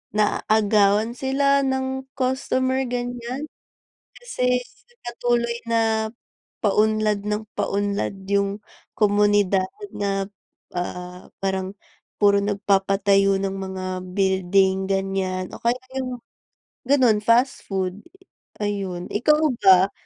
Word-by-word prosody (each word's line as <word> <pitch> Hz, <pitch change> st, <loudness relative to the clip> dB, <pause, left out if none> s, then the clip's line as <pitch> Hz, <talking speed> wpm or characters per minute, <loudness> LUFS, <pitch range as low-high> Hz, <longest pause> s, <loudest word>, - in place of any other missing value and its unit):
naaagawan 210 Hz, +1 st, +2 dB
sila 275 Hz, +1 st, +2 dB
ng 265 Hz, 0 st, -2 dB
customer, 260 Hz, 0 st, 0 dB
ganyan. 245 Hz, +3 st, -4 dB, 0.7 s
Kasi 250 Hz, -, 0 dB, 0.5 s
patuloy 235 Hz, 0 st, 0 dB
na, 225 Hz, -1 st, +1 dB, 0.5 s
paunlad 215 Hz, 0 st, +2 dB
ng 210 Hz, +1 st, -3 dB
paunlad 200 Hz, 0 st, -1 dB
yung 200 Hz, +1 st, 0 dB, 0.3 s
komunidad 205 Hz, -2 st, +3 dB, 0.3 s
na, 195 Hz, -1 st, -1 dB, 0.5 s
ah, 180 Hz, 0 st, -6 dB
parang 190 Hz, 0 st, -2 dB, 0.5 s
puro 200 Hz, -1 st, +5 dB
nagpapatayo 195 Hz, -1 st, +2 dB
ng 195 Hz, 0 st, -2 dB
mga 190 Hz, -1 st, -5 dB, 0.3 s
building, 190 Hz, 0 st, +2 dB
ganyan, 195 Hz, -1 st, -1 dB
o -, -, -12 dB
kaya 240 Hz, +2 st, +1 dB, 0.2 s
yung 255 Hz, -2 st, -3 dB, 0.7 s
gano'n, 250 Hz, -7 st, +4 dB
fast 235 Hz, +5 st, +3 dB
food, 190 Hz, 0 st, -2 dB, 0.6 s
ayun. 195 Hz, -4 st, -3 dB
Ikaw 300 Hz, +8 st, +3 dB, 0.2 s
ba, 190 Hz, -1 st, +6 dB
205 Hz, 95 wpm, -23 LUFS, 195-240 Hz, 0.7 s, ba